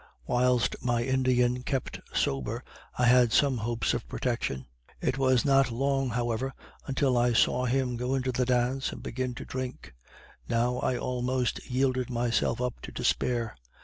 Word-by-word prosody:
Whilst 125 - +2
my 120 -1 +1
Indian 125 -1 +2
kept 130 0 -3
sober 70 -2 -1 0.3
I 125 - +3
had 120 -1 +5
some 140 0 +3
hopes 115 +1 0
of - - -3
protection. 65 -1 -2 0.3
It 135 - -1
was 130 -1 +3
not 135 -1 +4
loner 135 0 0
however 120 +2 -1 0.3
until 130 -2 +2
I 120 0 +3
saw 125 +2 +3
him 125 -1 0
go 125 +2 -1
into 130 -1 0
the 125 0 0
dance 125 +2 +1
and - - -9
begin 125 0 -3
to - - -7
drink. 130 - -6 0.6
Now 120 +1 +1
I 125 - 0
almost 125 0 -1
yielded 130 -1 +1
myself 120 -1 0
up 125 -1 -3
to - - -8
despair. 120 -3 0
125 Hz, 155 wpm, -28 LUFS, 120-130 Hz, 0.6 s, had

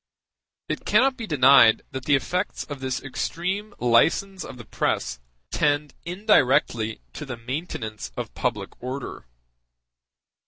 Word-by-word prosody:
It - - -3
cannot 260 +6 +3
be 230 -3 -6
denied 130 -6 +6
that 130 -1 -6
the 145 - +4
effects 180 +8 -2
of 145 -2 -7
this 130 -1 -3
extreme 185 +9 -3
license 165 +10 +2
of - - -9
the 120 - -10
press 65 -10 -1 0.3
tend 145 0 +1
indirectly 135 - +2
to - - -6
the 130 -4 -6
maintenance 115 - -5
of - - -5
public - - -2
order. 125 - -6
140 Hz, 125 wpm, -25 LUFS, 125-180 Hz, 0.3 s, denied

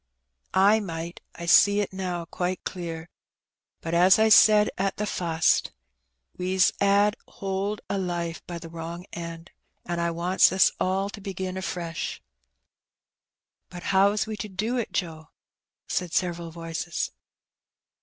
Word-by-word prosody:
I 200 +3 +5
might, 170 -3 -6
I 170 - -7
see 205 +4 +6
it 205 -2 -2
now 180 -3 -3
qoite 180 +2 -3
clear; 165 -2 -5 0.7
bat 165 - -4
as 180 +4 +6
I 220 0 +4
said 210 0 +7
at 195 +1 -1
the 210 - -1
fust, 170 -5 +1 0.6
we 185 +1 -2
's 185 - +5
*ad 200 +1 +4
hold 195 +2 -3
o' 200 - -2
life 175 -2 -3
by 175 - -5
the 170 - -9
wrong 165 +2 -7
end. 170 0 -7 0.3
An* 175 0 -3
I 170 0 +1
wants 175 +3 +3
ns 190 0 +4
all 195 +2 0
to 205 - -10
begin 190 -1 -4
afresh." 175 -3 -4 1.5
But 175 -1 -9
how 195 +1 +5
is 210 0 0
we 220 0 -5
to 210 +1 -5
do 215 +6 -2
it, 235 - -2
Joe?" 160 -4 -4 0.6
said 180 -2 -2
several 170 -2 -1
voices. 165 0 -4
180 Hz, 145 wpm, -26 LUFS, 170-195 Hz, 1.5 s, said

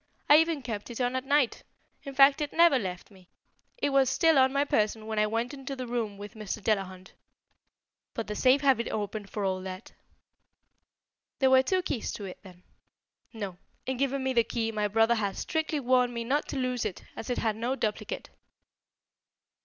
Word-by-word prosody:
I 295 - +8
even 320 -3 +1
kept 225 -3 -5
it 235 - -7
on 245 0 0
at 260 +1 -2
night. 285 -4 +2 0.4
In 275 -2 -8
fact 275 +2 +6
it 295 - -2
never 335 -5 +5
left 185 -2 -6
me. 185 -2 -19 0.5
It 285 - 0
was 270 -2 +4
still 320 +2 +4
on 260 0 +5
my 280 +1 +1
person 215 -3 0
when 220 -1 -2
I 210 - +3
went 230 +4 -2
into 275 0 -6
the 255 -1 -5
room 230 -4 -3
with 205 +2 -9
Mr. 215 -1 -5
Delahunt. 190 -3 -2 1.0
But 230 - -3
the 210 - -5
safe 260 +4 +4
had 275 -2 +4
been 235 - -3
opened 205 -1 -4
for 205 -2 -3
all 185 -1 -1
that." 185 +2 -8 1.5
"There 265 -1 +3
were 260 0 +7
two 370 +7 0
keys 240 -10 -3
to 205 - -7
it, 185 - -8
then?" 180 -2 -15 0.7
"No; 200 -6 -6 0.3
in 260 -1 -2
giving 275 0 0
me 265 0 0
the 235 -2 +4
key, 225 0 -2
my 210 -1 0
brother 225 +3 +3
had 205 -4 -2
strictly 315 -1 -1
warned 250 -2 +2
me 235 - -2
not 280 +6 0
to - - -4
lose 255 -2 -1
it, 210 -5 -5
as 225 - -7
it 245 - -1
had 220 -2 0
no 240 +4 -2
duplicate." 215 -5 -4
235 Hz, 200 wpm, -28 LUFS, 210-270 Hz, 1.5 s, I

